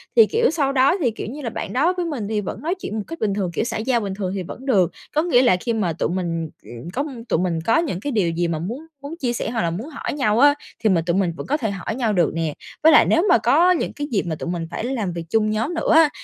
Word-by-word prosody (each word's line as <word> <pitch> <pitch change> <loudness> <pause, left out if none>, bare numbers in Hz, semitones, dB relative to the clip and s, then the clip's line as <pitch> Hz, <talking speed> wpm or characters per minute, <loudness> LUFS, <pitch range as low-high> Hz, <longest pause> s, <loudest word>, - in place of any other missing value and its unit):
Thì 455 - +8
kiểu, 465 +1 +2
sau 285 -4 +1
đó 275 +8 +4
thì, 245 -6 +2
kiểu 215 - -6
như 280 +7 -7
là 235 - -3
bạn - - -5
đó 310 +8 +2
với 355 - -1
mình 275 -11 -3
thì 210 -1 -1
vẫn 195 - -6
nói 335 +5 -1
chuyện 215 - -5
một 210 - -2
cách 330 0 -7
bình 205 -2 0
thường, 190 -4 -2
kiểu 170 - 0
xã - - -3
giao 235 +2 +1
bình 200 -3 -3
thường 190 -2 -3
thì 190 - -3
vẫn 245 +9 -9
được. 190 -10 +3 0.2
Có 305 - +4
nghĩa 320 -8 +4
là 245 -8 +4
khi 230 +5 -2
mà 190 -7 0
tụi 165 - -1
mình, 165 -3 -2
ừm, 120 +7 -9
có 280 - -1 0.3
tụi - - +2
mình 175 -2 0
có 225 +7 +2
những 295 - -1
cái 285 +6 -3
điều 200 -7 +1
gì 170 +1 0
mà 160 -2 -2
muốn 240 - -5 0.2
muốn 285 +3 -7
chia 245 -2 -1
sẻ - - -3
hoặc 230 -1 -1
là 170 -1 0
muốn 220 - -5
hỏi 295 - -5
nhau 230 -6 +1
á, 285 +2 +7 0.3
thì 220 - +4
mình 170 -4 +2
tụi 170 0 +1
mình 180 -4 +1
vẫn - - -6
có 295 +3 +1
thể 220 -7 -2
hỏi 195 +3 -4
nhau 230 -4 0
được 175 -5 +2
nè. 165 -2 -2 0.3
Với 320 - +8
lại 300 - +7
nếu 335 - +3
mà - - +7
có 360 +2 +4
những 355 - 0
cái 290 0 -4
dịp 205 - +1
mà 160 -2 -2
tụi 170 - -5
mình 170 -2 -3
phải - - -4
làm 230 -8 -2
việc 170 -1 -4
chung 215 +1 +2
nhóm 225 +10 -1
nữa 325 - 0
á, 320 -2 +7
220 Hz, 310 wpm, -22 LUFS, 180-285 Hz, 0.3 s, Thì